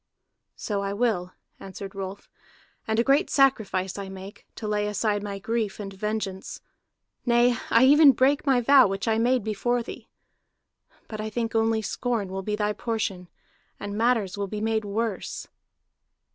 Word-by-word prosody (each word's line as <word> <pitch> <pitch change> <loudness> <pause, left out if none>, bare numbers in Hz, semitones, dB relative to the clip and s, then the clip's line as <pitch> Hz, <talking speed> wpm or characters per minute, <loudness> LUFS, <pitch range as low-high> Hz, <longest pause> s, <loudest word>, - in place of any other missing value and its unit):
"So 205 -2 -3
I 200 0 -2
will," 200 -5 -1 0.3
answered 195 0 -8
Rolf, 195 0 -7 0.6
"and 220 0 0
a 230 - +4
great 280 +8 +3
sacrifice 205 -9 +1
I 195 -1 -6
make, 190 +1 -10
to 215 - -6
lay 210 0 0
aside 210 0 0
my 200 -1 -5
grief 220 0 -2
and 195 -1 -6
vengeance. 200 -1 -4 0.6
Nay, 240 0 +3
I 230 - +5
even 290 +1 +8
break 270 +4 +2
my 265 -4 +3
vow 265 0 +6
which 195 +3 -3
I 220 0 +2
made 245 0 +2
before 235 +3 -1
thee. - - -10 1.0
But 215 -1 -6
I 215 - -3
think 230 +1 -3
only 225 -1 +1
scorn 230 -4 -2
will 190 +1 -4
be 210 +2 -2
thy 210 0 0
portion, 205 -6 -3 0.5
and 205 0 -5
matters 220 -4 +1
will 200 - -1
be 210 +2 -5
made 220 0 0
worse." 215 0 -3
215 Hz, 160 wpm, -26 LUFS, 200-235 Hz, 1.0 s, even